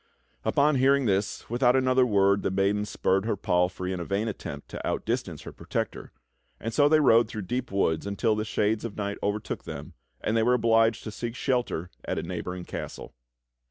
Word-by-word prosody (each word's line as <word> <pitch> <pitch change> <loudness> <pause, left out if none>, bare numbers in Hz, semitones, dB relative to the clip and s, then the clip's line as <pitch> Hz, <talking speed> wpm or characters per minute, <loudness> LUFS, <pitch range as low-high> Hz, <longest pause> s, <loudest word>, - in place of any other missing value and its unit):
LTpon 145 -1 +3
hearing 135 +1 +4
this, 100 -1 0
without 120 +1 +3
another 130 -1 +3
word 100 -2 +3
the - - 0
maiden 100 +2 +1
spurred 95 -1 +1
her 115 - 0
palfrey 90 -1 0
in 90 - -4
a - - -3
vain 100 +6 -1
attempt 105 - -6
to - - -7
outdistance - - -2
her - - -8
protector, - - -4 0.5
and 115 +1 -4
so 145 -1 +4
they 155 0 +5
rode 115 -5 +5
through 110 -2 -5
deep 125 +6 -3
w'oods 95 -3 0
until 105 +2 +1
the 105 - -1
shades 105 0 0
of 115 -3 -6
night 100 -1 -3
overtook 105 +1 -2
them, - - -8 0.3
and 110 - -1
they 115 - +3
w^ere 125 +2 +4
obliged 115 -1 +3
to 110 - -5
seek 115 +2 -5
shelter 120 - -1
at - - -3
a - - -2
neighboring 90 +1 -5
castle. - - -7
110 Hz, 195 wpm, -27 LUFS, 100-120 Hz, 0.5 s, they